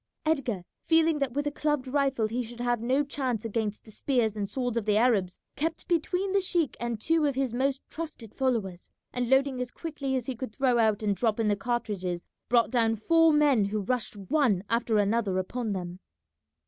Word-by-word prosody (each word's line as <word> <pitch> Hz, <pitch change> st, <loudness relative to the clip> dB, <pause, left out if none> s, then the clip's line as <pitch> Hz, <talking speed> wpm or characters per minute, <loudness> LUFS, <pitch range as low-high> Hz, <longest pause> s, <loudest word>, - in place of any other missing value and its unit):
Edgar, 260 Hz, -, 0 dB, 0.2 s
feeling 325 Hz, -1 st, +3 dB
that 275 Hz, -3 st, -1 dB
with 290 Hz, +2 st, -1 dB
a 290 Hz, -, 0 dB
clubbed 295 Hz, -2 st, -1 dB
rifle 270 Hz, -4 st, +1 dB
he 235 Hz, +3 st, -2 dB
should 240 Hz, 0 st, -8 dB
have 240 Hz, -1 st, 0 dB
no 260 Hz, +5 st, +2 dB
chance 255 Hz, -6 st, -2 dB
against 215 Hz, -2 st, -2 dB
the 220 Hz, -, -12 dB
spears 230 Hz, -2 st, 0 dB
and 200 Hz, -2 st, -3 dB
swords 245 Hz, -3 st, -2 dB
of 230 Hz, -3 st, -1 dB
the 210 Hz, -1 st, +3 dB
Arabs, 215 Hz, -6 st, +2 dB, 0.2 s
kept 325 Hz, +3 st, -3 dB
between 360 Hz, +3 st, 0 dB
the 395 Hz, -, +3 dB
sheik 345 Hz, -5 st, 0 dB
and 235 Hz, -2 st, -3 dB
two 320 Hz, +5 st, +2 dB
of 280 Hz, -, -1 dB
his 265 Hz, -3 st, -1 dB
most 265 Hz, +2 st, 0 dB
trusted 305 Hz, -9 st, -7 dB
followers, 220 Hz, -9 st, -1 dB, 0.2 s
and 245 Hz, -1 st, -1 dB
loading 265 Hz, -1 st, +3 dB
as 250 Hz, -, -3 dB
quickly 280 Hz, -3 st, -4 dB
as 255 Hz, -3 st, -1 dB
he 265 Hz, -, -3 dB
could 240 Hz, -2 st, -6 dB
throw 255 Hz, -3 st, +2 dB
out 220 Hz, -1 st, +2 dB
and 205 Hz, -1 st, +1 dB
drop 225 Hz, +1 st, 0 dB
in 220 Hz, -2 st, +2 dB
the 205 Hz, -, +3 dB
cartridges, 195 Hz, -6 st, -3 dB, 0.2 s
brought 235 Hz, 0 st, +3 dB
down 225 Hz, -3 st, +2 dB
four 325 Hz, +8 st, +4 dB
men 290 Hz, -8 st, +4 dB
who 210 Hz, +2 st, -2 dB
rushed 225 Hz, +1 st, -2 dB
one 205 Hz, -, +1 dB
after 230 Hz, -1 st, +2 dB
another 205 Hz, -1 st, +1 dB
upon 220 Hz, +4 st, -2 dB
them. 180 Hz, -1 st, -5 dB
245 Hz, 200 wpm, -28 LUFS, 215-280 Hz, 0.2 s, four